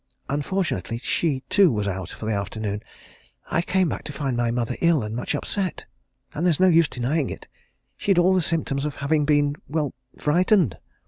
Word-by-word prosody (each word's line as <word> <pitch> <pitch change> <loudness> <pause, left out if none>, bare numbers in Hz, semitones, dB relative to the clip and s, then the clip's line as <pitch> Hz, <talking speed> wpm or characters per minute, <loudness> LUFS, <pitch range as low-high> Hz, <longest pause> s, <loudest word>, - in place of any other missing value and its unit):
Unfortunately, 145 -4 -1
she, 135 +2 -1
too, 195 -5 +5
was 105 -2 -1
out 95 -2 -3
for - - -8
the 110 - 0
afternoon. 105 +1 -3 0.7
I 170 - +2
came 185 +1 +1
back - - -4
to - - -5
find 140 -4 -2
my 120 0 +1
mother 120 -1 -1
ill 170 -7 +3
and 105 +1 -4
much 125 - -2
upset 190 -4 -3 0.5
and 155 - -3
there's 175 -4 +3
no 185 0 +6
use 165 -3 +5
denying 135 +4 -1
it - - -8 0.5
she'd 195 -3 +1
all 180 +2 +5
the 185 - +3
symptoms 155 -4 -1
of 150 -2 -3
having 150 +1 +1
been 145 -1 +2
well, 150 -2 -1 0.2
frightened. 175 - +2
145 Hz, 185 wpm, -24 LUFS, 120-170 Hz, 0.7 s, no